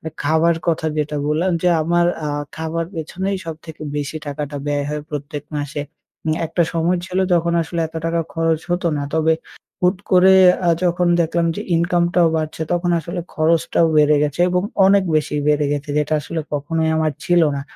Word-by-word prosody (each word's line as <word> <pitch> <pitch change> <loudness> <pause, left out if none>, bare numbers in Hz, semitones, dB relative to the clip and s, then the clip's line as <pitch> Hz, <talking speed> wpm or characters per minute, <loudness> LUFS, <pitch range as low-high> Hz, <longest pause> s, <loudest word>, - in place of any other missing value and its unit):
মানে 160 - -5
খাবার 160 +3 +3
কথা 160 -1 0
যেটা 150 0 -1
বললাম 160 +5 +1
যে, 180 - +3
আমার 175 +2 +2 0.2
আ - - -1 0.3
খাবার 160 +1 -2
পেছনেই 190 +5 -3
সবথেকে 160 -1 -8
বেশি 145 +1 -3
টাকাটা 145 0 -4
ব্যয় 145 -1 0
হয় 150 0 -3
প্রত্যেক 145 -1 -5
মাসে। 145 0 -3 0.4
উম 155 - +1
একটা 170 +2 +1
সময় 170 +2 +1
ছিল 185 0 -3 0.2
যখন 170 0 +1
আসলে 165 +1 -4
এত 160 - -18
টাকা 165 0 0
খরচ 165 -1 +1
হতো 175 0 0
না। 145 - -2
তবে 160 0 +3 0.5
হুট 180 +2 +3
করে 185 +1 +6 0.3
আ - - +5
যখন 175 0 +2
দেখলাম 170 +1 +1
যে - - -3
ইনকামটাও 170 0 +2
বাড়ছে 155 0 -3
তখন 175 0 0
আসলে 170 +3 -5
খরচটাও 165 +1 +2
বেড়ে 150 0 +5
গেছে 150 +2 -1
এবং 180 0 +1 0.2
অনেক 195 0 +4
বেশি 150 -1 -1
বেড়ে 150 0 +2
গেছে 145 0 -4
যেটা 150 +1 0
আসলে 160 +3 -4
কখনোই 160 +2 -1
আমার 155 -1 +1
ছিল 175 -1 +3
না। 135 - -4
160 Hz, 180 wpm, -20 LUFS, 150-175 Hz, 0.5 s, করে